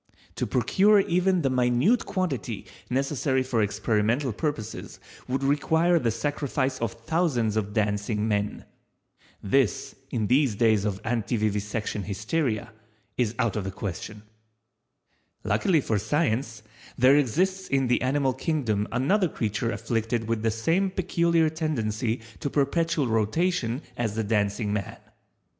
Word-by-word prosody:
To - - -1
procure 205 +1 +4
even 180 -1 +1
the 135 - +1
minute 125 - +2
quantity 145 - -2 0.2
necessary 135 0 0
for 125 -3 0
experimental 110 +5 0
purposes 115 -4 -4 0.3
would 130 +1 -1
require 160 +5 +3
the 120 - +1
sacrifice 135 +2 -1
of 115 -4 -1
thousands 125 -4 0
of 105 -2 -1
Dancing 105 0 0
men. 105 -1 -1 0.8
This 125 +3 +1 0.2
in 110 -3 -1
these 130 0 +3
days 110 -2 +3
of 100 0 -3
Antivivisection 105 -2 -1
Hysteria, 110 +2 -2 0.4
is 120 -2 0
out 115 -4 0
of 105 - -1
the 95 - -3
question. 100 +2 -6 1.2
Luckily 150 - +2
for 110 -5 0
Science, 115 - -1 0.3
there 130 +3 +6
exists 185 - +1
in 135 -1 +1
the 125 0 +2
animal 135 0 +1
Kingdom 125 -7 -1
another 175 - +2
creature 110 -2 -2
afflicted 115 0 -2
with 115 -1 -1
the 115 - +1
same 165 - +1
peculiar 170 -3 +2
tendency 120 -8 -2 0.2
to 140 - -2
perpetual 155 +2 +1
rotation 120 - 0
as 110 -3 -2
the 110 - 0
Dancing 105 0 0
man. 100 -2 -3
120 Hz, 130 wpm, -26 LUFS, 110-150 Hz, 1.2 s, there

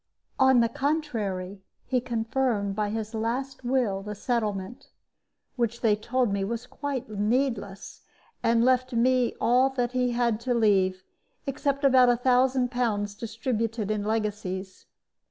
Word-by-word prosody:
On 265 -2 +6
the 230 - +3
contrary, 225 -10 -2 0.2
he 255 -1 0
confirmed 230 -3 -1
by 210 0 -1
his 220 +1 -4
last 245 +5 -3
will 240 -6 0
the 210 +1 -6
settlement 215 -2 -3 0.7
which 235 -1 -1
they 215 -2 +4
told 235 +1 0
me 200 -1 0
was 230 +4 -3
quite 280 -1 -4
needless 215 -1 -2 0.4
and 230 0 +3
left 255 0 +2
me 250 +1 +2
all 250 +3 +4
that 245 -2 -1
he 250 -1 0
had 235 -2 +1
to 245 +1 -1
leave, 190 -4 +2 0.4
except 280 0 -2
about 260 -2 +6
a 240 - +3
thousand 255 0 +2
pounds 210 -5 -1
distributed 230 -1 -3
in 210 -1 -1
legacies. 205 -3 -3
235 Hz, 135 wpm, -27 LUFS, 210-255 Hz, 0.7 s, On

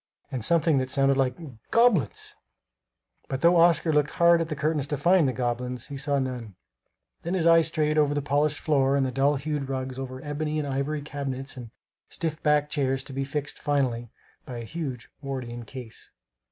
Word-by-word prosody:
and 125 -4 -3
something 160 +1 +3
that 130 0 -2
sounded 135 0 +3
like 130 -2 +1 0.3
"Goblins!" 225 - +2 0.9
But 135 0 -3
though 170 +1 +5
Oscar 165 -1 +4
looked 150 -1 +3
hard 170 0 +4
at 165 - -2
the 150 - -2
curtains 150 0 0
to 145 - -2
find 170 +2 +4
the - - +1
goblins, 125 0 -3
he 140 - -6
saw 140 0 0
none. 125 -6 -4 0.7
Then 170 +3 -2
his 170 -3 0
eyes 165 -1 +6
strayed 155 -1 +1
over 145 -1 +2
the 145 - 0
polished 145 +1 +1
floor 140 -3 +2
and 140 -1 +2
the 130 - -2
dull 135 +3 +2
hued 140 -1 -3
rugs, 130 -1 -3
over 130 -1 -6
ebony 150 +1 -2
and 150 -1 -1
ivory 140 +2 -2
cabinets 135 -2 -5
and 120 -3 -8 0.4
stiff 160 -2 -3
backed 150 -1 +2
chairs, 135 -3 0
to 135 - -10
be 135 +1 -1
fixed, 145 +1 -4
finally, 125 -5 0 0.3
by 125 - -7
a 120 - -5
huge 135 -4 -5
Wardian 125 -4 -5
case. 125 -1 -9
140 Hz, 190 wpm, -26 LUFS, 130-155 Hz, 0.9 s, eyes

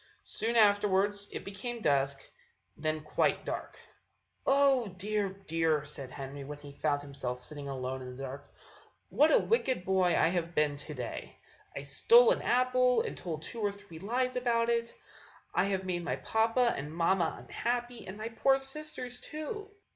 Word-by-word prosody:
Soon 230 +1 -2
afterwards 205 -1 +3
it - - -6
became 225 +5 -5
dusk, 140 -6 +1 0.5
and - - -16
then 155 0 0
quite 150 - +1
dark. - - -5 0.7
"Oh! 275 -4 +4
dear, 205 +1 0
dear," 165 -5 0
said 140 -3 -4
Henry, 140 +1 -7
when 145 +2 -7
he 145 -1 -11
found 145 0 0
himself 135 -3 -4
sitting 140 +2 -6
alone 130 0 -3
in 125 0 -7
the 135 - -7
dark, 135 +1 -7 0.6
"what 305 +2 +4
a - - +7
wicked 260 - +1
boy 185 -3 +3
I - - +4
have 170 -1 -2
been 150 -1 +2
to 150 +1 -6
day! 125 -2 -6 0.4
I 140 - -4
stole 465 - +6
an - - +1
apple, 255 0 +3
and - - -4
told 160 -3 -5
two 230 - -6
or 205 -1 +1
three 200 -5 -12
lies 250 +7 0
about 235 -2 +1
it! 235 0 0 0.6
I - - +3
have 190 -1 -1
made 175 -2 -2
my 165 - -1
papa 230 +2 +2
and 145 +2 -5
mamma 170 +1 +1
unhappy, 240 0 -3
and 190 +2 -7
my 220 +1 -4
poor 270 +4 +3
sisters, 270 -2 -5
too! 405 +7 -6
195 Hz, 170 wpm, -31 LUFS, 150-240 Hz, 0.7 s, a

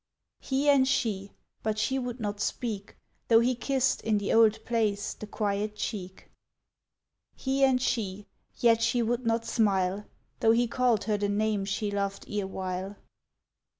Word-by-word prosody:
He 270 +2 -1
and 275 -2 +5
she; 200 -6 -1 0.3
but 215 -1 -1
she 265 +5 0
would 245 -1 -5
not 205 -2 -3
speak, 205 -1 -3 0.3
Though 225 -1 +6
he 245 +2 +2
kissed, 265 +2 0
in 220 -1 +1
the 205 0 -1
old 225 -1 +4
place, 215 -4 0
the 215 - -9
quiet 210 0 -2
cheek. 190 -4 -6 1.0
He 270 0 0
and 260 -2 +4
she; 205 -5 -2 0.3
yet 230 -1 +3
she 235 +1 +2
would 235 +1 -1
not 230 0 +1
smile, 200 -3 +1 0.3
Though 225 0 +4
he 240 +1 +3
called 240 -2 +1
her 215 -2 0
the 205 0 -1
name 210 -1 0
she 205 +1 -2
loved 200 -1 -2
ere 205 -2 -2
while. 190 +1 -4
220 Hz, 155 wpm, -28 LUFS, 205-240 Hz, 1.0 s, Though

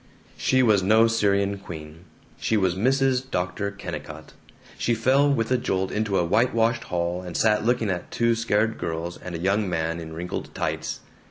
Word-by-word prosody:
She 130 0 +2
was 105 -5 +4
no 110 +4 +5
Syrian 100 -3 +1
queen. 80 -3 -10 0.3
She 110 - +1
was 95 -3 +2
Mrs. 130 +5 +1
Dr. 90 +1 -2
Kennicott. 80 -6 -8 0.4
She 120 - 0
fell 135 +5 +3
with 115 -3 0
a 130 - +3
jolt 95 -4 -1
into 105 -2 0
a 85 - +2
whitewashed 115 +4 +2
hall 85 0 -2
and 90 -2 -5
sat 105 -1 +3
looking 120 -4 +1
at 90 -1 -4
two 115 0 +2
scared 110 -1 0
girls 85 +2 -4
and 90 -1 -7
a - - -4
young 100 +3 +1
man 85 -1 -1
in 80 -1 -8
wrinkled 85 +2 -5
tights. - - -3
100 Hz, 175 wpm, -25 LUFS, 90-115 Hz, 0.4 s, no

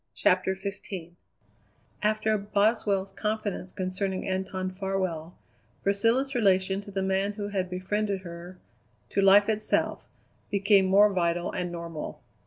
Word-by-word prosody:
CHAPTER 185 +1 +2
XV 190 -3 -7 0.9
After 215 +1 +2
Boswell's 205 -1 +1
confidence 210 -3 -3
concerning 185 0 -3
Anton 185 0 -2
Farwell, 185 -4 -3 0.5
Priscilla's 230 +7 +2
relation 195 -4 +2
to 200 - -12
the 195 -1 -2
man 190 +2 0
who 205 -1 -4
had 190 -3 -2
befriended 195 +2 -1
her, 175 0 -9 0.5
to 200 - +2
life 195 +1 +7
itself, 215 -1 0 0.4
became 200 -1 +4
more 200 +2 +5
vital 175 -1 0
and 180 -1 -3
normal. 170 -2 -6
195 Hz, 120 wpm, -27 LUFS, 185-205 Hz, 0.9 s, life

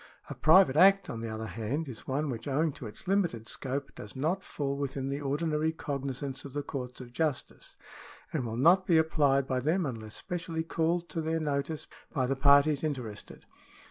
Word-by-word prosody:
A - - -2
private 160 -2 +6
Act, 195 +4 +6
on 115 - -5
the 115 - -4
other 110 0 -4
hand, 120 +9 -3
is 125 -4 -9
one 140 +2 -1
which, 115 +1 -6
owing 150 +3 +1
to 125 - -8
its 105 - -8
limited 170 - 0
scope, 135 +3 -4
does 105 - -10
not 165 +8 -1
fall 140 -5 -3
within 135 -1 -3
the 140 +1 -3
ordinary 150 +2 0
cogni 140 -3 -4
sance 135 -2 -4
of 140 - -9
the 145 0 -2
courts 125 -3 -6
of 120 -2 -10
justice, 155 -2 -3 0.6
and 150 -5 0
will 115 -1 -4
not 180 +8 +5
be 170 - +5
applied 145 -4 +3
by 130 -1 0
them 160 +7 +1
unless 110 -5 -5
specially 165 -2 -4
called 170 +1 0
to 165 - -3
their 160 +1 0
notice 150 0 -2 0.3
by 130 -4 0
the 135 +2 0
parties 140 +2 +5
^ - - -12
interested. 125 -9 -5
140 Hz, 200 wpm, -30 LUFS, 130-160 Hz, 0.6 s, private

